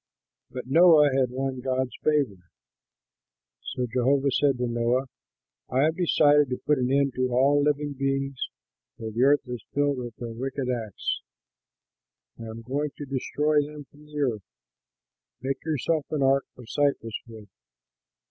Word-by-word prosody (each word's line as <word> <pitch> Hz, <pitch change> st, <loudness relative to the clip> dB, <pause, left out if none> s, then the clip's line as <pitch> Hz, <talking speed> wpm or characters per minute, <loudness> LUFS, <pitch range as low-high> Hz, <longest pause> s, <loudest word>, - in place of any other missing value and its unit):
But 125 Hz, -1 st, -6 dB
Noah 155 Hz, +1 st, +6 dB
had 130 Hz, -2 st, +2 dB
won 130 Hz, 0 st, -3 dB
Jehovah's 130 Hz, 0 st, -1 dB
favor. 140 Hz, -11 st, +1 dB, 1.2 s
So 125 Hz, -, -3 dB
Jehovah 135 Hz, +3 st, +1 dB
said 140 Hz, 0 st, +2 dB
to 125 Hz, -, -1 dB
Noah, 120 Hz, +2 st, +1 dB, 0.6 s
"I 130 Hz, -, +2 dB
have 160 Hz, +1 st, +2 dB
decided 150 Hz, -5 st, +4 dB
to 125 Hz, -, -2 dB
put 150 Hz, -2 st, +1 dB
an 125 Hz, 0 st, 0 dB
end 140 Hz, -1 st, +2 dB
to 130 Hz, 0 st, 0 dB
all 140 Hz, +4 st, +4 dB
living 145 Hz, 0 st, 0 dB
beings, 135 Hz, 0 st, -2 dB, 0.5 s
for 110 Hz, -1 st, -5 dB
the 115 Hz, +3 st, -2 dB
earth 140 Hz, 0 st, +4 dB
is 125 Hz, -3 st, -6 dB
filled 145 Hz, -2 st, +1 dB
with 120 Hz, -2 st, -6 dB
their 115 Hz, 0 st, -6 dB
wicked 130 Hz, +2 st, -3 dB
acts. 110 Hz, -5 st, -3 dB, 1.2 s
I 115 Hz, -, -7 dB
am 110 Hz, +1 st, -8 dB
going 140 Hz, +5 st, -2 dB
to 145 Hz, -, -6 dB
destroy 150 Hz, +3 st, +1 dB
them 145 Hz, 0 st, -8 dB
from 150 Hz, +1 st, -18 dB
the 150 Hz, 0 st, -7 dB
earth. 120 Hz, -7 st, 0 dB, 1.0 s
Make 135 Hz, +2 st, -3 dB
yourself 155 Hz, 0 st, -1 dB
an 150 Hz, -3 st, 0 dB
ark 135 Hz, +1 st, +3 dB
of 125 Hz, -2 st, -12 dB
cypress 130 Hz, -5 st, 0 dB
wood. 110 Hz, -3 st, -11 dB
135 Hz, 155 wpm, -26 LUFS, 125-145 Hz, 1.2 s, Noah